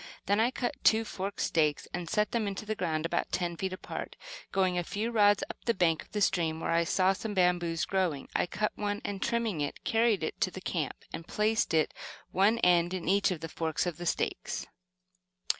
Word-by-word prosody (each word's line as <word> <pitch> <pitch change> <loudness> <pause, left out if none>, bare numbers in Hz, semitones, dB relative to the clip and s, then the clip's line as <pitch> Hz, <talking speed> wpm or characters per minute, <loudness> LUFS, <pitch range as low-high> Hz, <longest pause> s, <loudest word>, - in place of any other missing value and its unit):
Then 205 +1 +2
I 230 +2 +4
cut 250 -1 -2
two 225 +1 +5
forked 200 0 -4
stakes 150 -3 +1
and 175 -1 -4
set 210 -1 +1
them 230 -4 0
into 200 +1 -4
the 215 - -1
ground 165 -6 -1
about 165 - -1
ten 175 -2 -1
feet 190 +2 -3
apart. 185 - -6 0.4
Going 185 -2 +2
a 175 - 0
few 215 +6 -2
rods 205 -2 +4
up - - -10
the 235 - +2
bank 165 -4 +2
of - - -16
the 210 - -2
stream 165 -5 +1
where 165 - -2
I 170 0 +3
saw 185 +2 +3
some 205 +2 -5
bamboos 175 -3 +2
growing, 175 -7 0
I - - +2
cut 210 +4 -1
one, 205 0 -2
and 200 -1 -3
trimming 230 -9 0
it, 145 - -4
carried 225 -5 +2
it - - -4
to - - +3
the 185 - -8
camp, 165 -6 -2 0.2
and 165 +1 -6
placed 215 +1 +1
it, 155 - +2 0.4
one 200 +5 +4
end 175 0 +4
in 180 - -5
each 200 +2 +4
of 175 -4 -3
the 165 - -4
forks 160 0 -1
of 175 -3 -3
the 175 0 -5
stakes. - - -1
185 Hz, 215 wpm, -30 LUFS, 170-210 Hz, 0.4 s, two